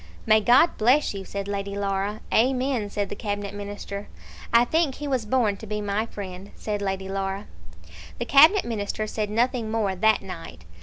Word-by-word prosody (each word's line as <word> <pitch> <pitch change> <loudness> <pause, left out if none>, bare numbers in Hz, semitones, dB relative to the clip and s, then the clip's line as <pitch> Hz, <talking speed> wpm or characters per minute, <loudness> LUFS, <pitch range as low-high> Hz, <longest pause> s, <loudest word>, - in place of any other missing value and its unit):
"May 215 0 +5
God 250 +9 +4
bless 250 +6 +3
you," 195 -1 -6
said 200 0 -5
Lady 200 0 -3
Laura. 200 +1 -2
"Amen," 255 -2 +2
said 200 -1 -2
the - - -5
Cabinet 205 -2 -4
Minister. 205 0 -6 0.4
"I 235 +1 +6
think 315 0 +1
he 295 - -5
was 255 -6 -1
born 215 -4 +2
to 220 - -10
be 210 0 -3
my 205 +2 -1
friend," 195 -2 -8
said 210 -1 -3
Lady 195 -1 -2
Laura. 195 +1 -3 0.7
The - - -3
Cabinet 315 +9 +6
Minister 215 -1 -3
said 215 -1 -3
nothing 235 +1 0
more 220 -3 0
that 220 +3 +3
night. 165 - -9
210 Hz, 175 wpm, -25 LUFS, 200-235 Hz, 0.7 s, I